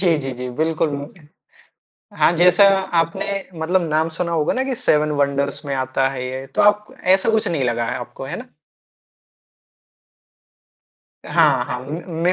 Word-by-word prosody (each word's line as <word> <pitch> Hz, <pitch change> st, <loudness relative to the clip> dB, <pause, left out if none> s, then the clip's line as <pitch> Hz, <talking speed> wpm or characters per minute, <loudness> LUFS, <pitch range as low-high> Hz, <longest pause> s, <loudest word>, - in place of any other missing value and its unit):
जी, 175 Hz, -4 st, +3 dB
जी, 135 Hz, -2 st, -4 dB
जी 125 Hz, 0 st, -6 dB
बिल्कुल, 160 Hz, 0 st, 0 dB
मु 145 Hz, 0 st, -4 dB, 1.1 s
हाँ, -, -, +4 dB
जैसा 180 Hz, +3 st, +6 dB, 0.4 s
आपने 165 Hz, 0 st, -2 dB, 0.3 s
मतलब 180 Hz, +3 st, +1 dB
नाम 155 Hz, +1 st, +1 dB
सुना 170 Hz, -1 st, -2 dB
होगा 155 Hz, -3 st, +1 dB
ना 260 Hz, -, 0 dB
कि 265 Hz, -, -2 dB
सेवन 155 Hz, -11 st, +2 dB
वंडर्स 140 Hz, +1 st, -1 dB
में 140 Hz, -, -2 dB
आता 130 Hz, 0 st, 0 dB
है 130 Hz, -2 st, -5 dB
ये, 130 Hz, +1 st, -6 dB
तो 135 Hz, -, -2 dB
आप 210 Hz, 0 st, +4 dB
क -, -, -17 dB, 0.2 s
ऐसा 195 Hz, +3 st, +1 dB
कुछ 220 Hz, -1 st, +1 dB
नहीं 150 Hz, -6 st, -1 dB
लगा 120 Hz, -1 st, 0 dB
है -, -, -2 dB
आपको, 125 Hz, +2 st, -8 dB
है 135 Hz, -, -5 dB
ना? 250 Hz, -, -9 dB, 2.8 s
हाँ, 145 Hz, -7 st, +3 dB
हाँ 125 Hz, 0 st, -4 dB
उम, 135 Hz, +4 st, -6 dB, 0.3 s
मे 180 Hz, +1 st, +3 dB
150 Hz, 170 wpm, -20 LUFS, 135-175 Hz, 2.8 s, जैसा